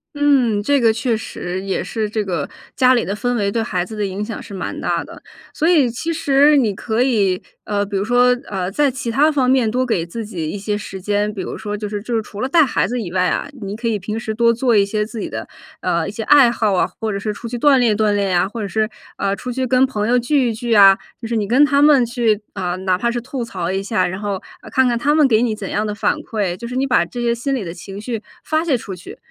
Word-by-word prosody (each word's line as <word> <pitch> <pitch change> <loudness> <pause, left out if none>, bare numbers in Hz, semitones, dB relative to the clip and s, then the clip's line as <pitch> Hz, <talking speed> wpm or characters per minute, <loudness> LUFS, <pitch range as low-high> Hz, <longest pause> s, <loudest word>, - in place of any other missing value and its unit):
嗯， 270 -8 +3
这 280 +5 +2
个 230 -1 +5
确 230 +1 0
实 185 -4 -5
也 195 -1 -2
是 220 -2 -3
这 215 0 -1
个， 170 -7 -3 0.3
家 255 0 +5
里 240 - +1
的 195 - -2
氛 245 +3 -1
围 200 -3 0
对 225 +2 -1
孩 180 -4 -2
子 220 - -9
的 210 -1 -1
影 195 +1 -4
响 225 - -6
是 205 - -11
蛮 190 - -5
大 - - -1
的， - - -13 0.3
所 320 - +1
以 300 -8 +4
其 245 +8 -3
实 290 -2 +4
你 220 -7 +1
可 220 +3 -1
以， 205 -8 +2 0.2
呃， 205 -1 -1
比 200 0 -6
如 195 - +1
说， 245 +2 +3
呃， 185 -3 -2
在 280 +7 +1
其 250 -2 -4
他 290 +7 +3
方 265 -4 +1
面 255 -4 +3
多 255 +2 0
给 190 -9 0
自 220 +6 -6
己 170 -7 -4
一 205 - -4
些 205 +1 -2
时 195 -2 -7
间， 205 +2 0
比 200 - -5
如 - - -5
说 210 -1 -4
就 210 0 -4
是 205 0 -5
就 240 - -4
是 225 - +1
除 210 -1 -9
了 260 - -1
带 320 0 +5
孩 260 - 0
子 245 0 -2
以 190 - -5
外 185 -1 +2
啊， - - -1
你 200 -1 -5
可 230 +2 -4
以 220 - +1
平 210 +3 -4
时 220 -1 -4
多 235 +1 +4
做 235 0 +1
一 200 -1 +5
些 210 +1 -1
自 230 +2 -9
己 - - -4
的， - - -6 0.3
呃， - - 0
一 - - -5
些 - - -5
爱 280 -5 +6
好 215 -4 0
啊， 185 - +3
或 225 - -2
者 - - -2
是 210 +2 -3
出 210 +3 -7
去 240 +1 -4
锻 280 +2 +5
炼 235 -4 +3
锻 215 0 +2
炼 200 -1 0
呀， 180 +2 +2
或 230 +1 -6
者 205 - -3
是， 215 +2 0 0.3
呃， 195 0 -1
出 250 +5 -6
去 260 +1 -1
跟 255 +1 +4
朋 215 -4 -2
友 250 +1 +4
聚 255 0 +1
一 - - -2
聚 235 +1 -2
啊， 195 -2 +8 0.2
就 - - -6
是 230 0 -1
你 205 - -1
跟 255 +7 +5
他 285 -1 +3
们 290 -4 +6
去， 230 -3 0
呃， 180 -3 -2
哪 185 -1 +1
怕 235 +5 0
是 240 0 -2
吐 250 0 -5
槽 180 -5 -3
一 190 +1 -1
下， 195 -2 0
然 185 +2 -4
后， 205 -1 -2 0.3
呃， - - -12
看 260 - +3
看 240 -2 +1
他 295 +4 +2
们 310 -2 +5
给 225 -4 +3
你 235 -3 0
怎 205 -3 -6
样 210 +1 -1
的 210 - -3
反 - - 0
馈。 200 -5 -3
就 235 - -7
是 250 - -6
你 265 +1 +1
把 260 - +3
这 245 - -6
些 235 0 +1
心 270 +4 -2
里 245 - -3
的 165 -2 -6
情 195 +3 -9
绪 225 -1 -4 0.2
发 315 +1 0
泄 300 -6 +2
出 205 -4 -7
去。 180 -1 -10
225 Hz, 305 characters per minute, -19 LUFS, 200-250 Hz, 0.3 s, 啊